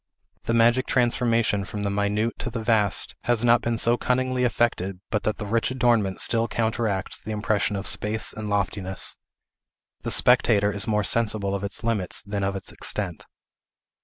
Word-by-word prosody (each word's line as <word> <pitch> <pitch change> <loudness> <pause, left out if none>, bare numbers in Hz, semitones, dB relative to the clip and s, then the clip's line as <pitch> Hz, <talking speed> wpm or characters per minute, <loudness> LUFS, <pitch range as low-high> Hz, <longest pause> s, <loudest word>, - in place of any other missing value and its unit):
The 115 - 0
magic 120 +3 +3
transformation 115 -4 +1
from 105 +2 -6
the 100 -1 -1
minute 105 +3 -1
to - - -3
the 115 -1 -5
vast 105 -4 +2
has 120 -1 +1
not 120 0 +5
been 120 -1 -1
so 115 +1 +3
cunningly 130 0 0
effected 105 -6 0
but 105 -3 0
that 110 - -2
the 105 - -5
rich 115 +3 0
adornment 120 -7 +1
still 115 0 +1
counteracts 110 -4 -2
the - - -10
impression 105 -1 -1
of 100 0 -4
space 110 +1 0
and 105 -1 -6
loftiness. 95 -2 -2 0.8
The - - -4
spectator 110 -4 +4
is 100 -1 -1
more 105 -1 +1
sensible 105 -3 +1
of 100 0 -3
its 100 +2 -4
limits 110 -5 -1
than 100 0 -4
of 95 0 -1
its 95 - -4
extent. - - -4
110 Hz, 170 wpm, -24 LUFS, 100-115 Hz, 0.8 s, not